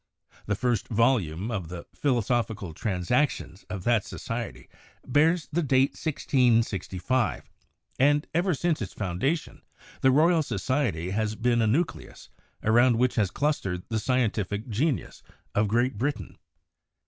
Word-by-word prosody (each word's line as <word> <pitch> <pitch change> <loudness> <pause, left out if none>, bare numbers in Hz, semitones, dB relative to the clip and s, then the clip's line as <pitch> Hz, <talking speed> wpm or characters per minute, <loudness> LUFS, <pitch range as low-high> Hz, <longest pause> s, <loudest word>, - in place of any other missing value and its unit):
The 105 - +1
first 120 -1 0
volume 110 -5 +1
of 95 -7 -3
the 85 0 -8
'Philosophical 115 - -1
Transactions' 105 - -1
of 95 -3 -5
that 115 -2 +2
society 115 - -6 0.4
bears 155 +5 +2
the 175 - +2
date 135 -2 +3
1665, 120 - 0 0.5
and 145 +2 +4
ever 175 +1 +1
since 165 -1 0
its 95 - -5
foundation 110 - -2 0.4
the 130 - +5
Royal 160 +5 +4
Society 105 - -1
has 110 +1 -1
been 120 +1 +1
a 110 - +2
nucleus 160 +9 -2 0.3
around 120 +3 +4
which 125 +1 +2
has 105 -5 +1
clustered 95 -11 -1
the 110 -1 0
scientific 110 -3 -1
genius 130 +6 -1 0.3
of 105 +1 +2
Great 120 +1 +1
Britain. 125 - -3
120 Hz, 125 wpm, -27 LUFS, 100-135 Hz, 0.5 s, the